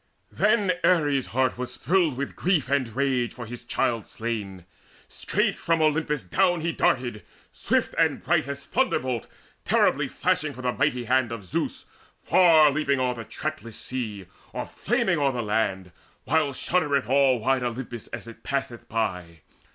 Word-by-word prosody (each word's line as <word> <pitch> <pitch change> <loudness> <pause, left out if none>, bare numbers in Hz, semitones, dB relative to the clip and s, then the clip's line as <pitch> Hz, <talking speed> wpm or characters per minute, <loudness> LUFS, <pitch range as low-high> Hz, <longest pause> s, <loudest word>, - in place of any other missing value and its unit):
Then 210 -2 +2
Ares' 145 -7 +3
heart 130 0 0
was 125 - -5
thrilled 170 -7 +1
with 140 +1 -4
grief 165 -7 +1
and 140 -3 +1
rage 125 0 0
For 120 - -7
his 120 +2 -8
child 115 -2 -1
slain. 105 -6 -5 0.4
Straight - - 0
from 165 -1 0
Olympus 150 -4 +1
down 170 - +2
He 170 +1 0
darted, 125 -7 0 0.3
swift - - 0
and - - +2
bright - - +2
as 140 0 -5
thunderbolt 130 - 0 0.4
Terribly - - +2
flashing - - 0
from 130 - -10
the 125 - +1
mighty 125 0 0
hand 130 -1 +2
Of 110 -4 -6
Zeus, 90 - -3 0.4
far 160 -5 +6
leaping 140 -2 0
o'er 125 -1 +1
the 115 -1 -7
trackless 155 -8 -5
sea, 110 -7 -5 0.3
Or - - -3
flaming - - 0
o'er 140 -2 +2
the 120 -1 -2
land, 100 -4 -1 0.3
while 155 -3 +1
shuddereth 140 -3 0
All 135 0 +4
wide 130 +3 +1
Olympus 120 -1 -5
as - - -7
it 115 - -11
passeth 135 -4 -4
by. 90 -7 -3
130 Hz, 160 wpm, -25 LUFS, 115-150 Hz, 0.4 s, far